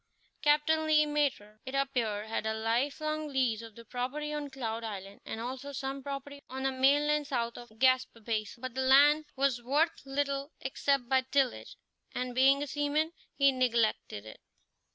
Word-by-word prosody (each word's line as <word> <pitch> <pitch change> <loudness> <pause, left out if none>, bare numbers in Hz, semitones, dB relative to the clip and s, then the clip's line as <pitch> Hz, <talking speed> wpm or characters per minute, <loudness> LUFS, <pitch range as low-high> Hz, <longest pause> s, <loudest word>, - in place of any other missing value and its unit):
Captain 310 +2 +3
Le 305 -1 +5
Maître, 280 -8 -1
it 260 +1 -6
appeared, 235 -6 0
had 220 0 -2
a 220 - 0
life 230 +7 0
long 310 0 -2
lease 255 -6 0
of 225 -2 -11
the 230 - -12
property 260 +6 -3
on 295 -1 -3
Cloud 230 -4 -4
Island, 200 -2 -7
and 220 - -5
also 260 +4 -5
some 275 0 -4
property 280 +1 -6
on 265 +1 -5
the 270 - +1
mainland 290 +3 +3
south 235 -3 -1
of 240 0 -10
Gaspé 255 0 +2
Basin; 220 0 -3
but 255 -1 -5
the 265 - -2
land 290 +4 +6
was 270 -3 +1
worth 295 +7 +1
little 275 +1 -2
except 270 -1 0
by 260 0 +3
tillage, 260 -1 0 0.4
and, 250 0 -2
being 270 +3 +4
a - - -2
seaman, 295 +2 0 0.2
he 275 -1 +5
neglected 235 - 0
it. 110 - -11
265 Hz, 175 wpm, -31 LUFS, 235-285 Hz, 0.4 s, land